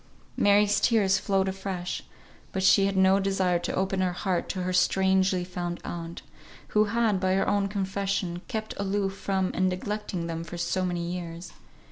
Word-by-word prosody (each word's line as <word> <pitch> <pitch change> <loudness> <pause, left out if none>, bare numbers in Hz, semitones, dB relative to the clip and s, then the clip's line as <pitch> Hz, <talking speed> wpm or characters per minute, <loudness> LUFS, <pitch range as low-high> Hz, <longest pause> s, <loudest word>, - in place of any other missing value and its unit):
Mary's 205 0 +4
tears 200 -5 +3
flowed 195 -1 +1
afresh, 190 -2 -4 0.5
but 190 - -2
she 195 +1 +5
had 195 -1 -2
no 190 +1 +5
desire 190 -3 +1
to - - -3
open 190 0 0
her 180 -1 +1
heart 180 -1 -2
to 185 -2 -2
her 185 0 -2
strangely 190 0 +3
found 175 -1 -4
aunt, 170 0 -6 0.5
who 215 0 +3
had, 220 -2 +1
by 185 0 +1
her 195 - +1
own 200 -1 +2
confession, 195 -2 -2
kept 220 0 -4
aloof 195 0 -1
from 190 -1 -1
and 185 0 +2
neglected 185 -2 -3
them 165 0 -4
for 170 +1 -8
so 185 +2 -1
many 175 -1 -1
years. 170 -1 -6
190 Hz, 170 wpm, -27 LUFS, 180-195 Hz, 0.5 s, she